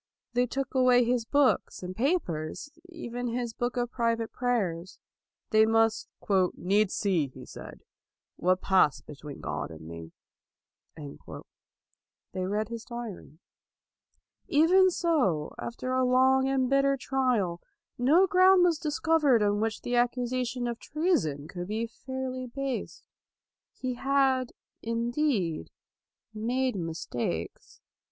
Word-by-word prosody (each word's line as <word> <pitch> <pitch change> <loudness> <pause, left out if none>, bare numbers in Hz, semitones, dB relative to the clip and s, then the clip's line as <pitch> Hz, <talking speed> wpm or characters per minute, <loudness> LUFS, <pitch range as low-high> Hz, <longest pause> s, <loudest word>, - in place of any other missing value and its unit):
They 245 +1 +2
took 270 +2 -3
away 255 -2 +5
his 240 -1 0
books 285 -7 +1
and 180 +1 -6
papers, 235 - -2 0.2
even 245 -8 -5
his 240 -1 -3
book 245 +2 -3
of 245 0 -1
private 230 -2 -1
prayers. 190 -8 -2 0.5
They 215 -1 +6
must 225 0 +2 0.3
" 185 -1 +2
needs 200 +2 +1
see," 180 -8 +1
he 130 - -12
said, - - -11 0.3
" - - -65
what 185 +1 +1
passed 185 -7 +3
between 145 -1 -10
God - - -4
and 80 0 -11
me." 85 0 -9 2.2
They 185 -1 -2
read 210 +2 -1
his 230 -1 -6
diary. 235 - -8 1.1
Even 365 +6 +5
so, 275 - 0
after 250 +2 -5
a 260 0 +2
long 260 +1 +4
and 265 -1 +1
bitter 275 +1 +3
trial, 250 -10 0 0.4
no 305 +10 +5
ground 375 -1 +5
was 340 -3 +2
discovered 300 -5 +2
on 205 0 +1
which 220 -1 -2
the 245 0 0
accusation 245 0 0
of 235 -1 -3
treason 280 - -1
could 175 +1 -6
be 220 +3 -2
fairly 255 +2 -6
based. 275 +1 -4 0.7
He 255 -1 -3
had, 265 -1 +1 0.3
indeed, 230 - -1 0.6
made 245 +3 -1
mistakes. 160 - -4
240 Hz, 125 wpm, -28 LUFS, 195-265 Hz, 2.2 s, They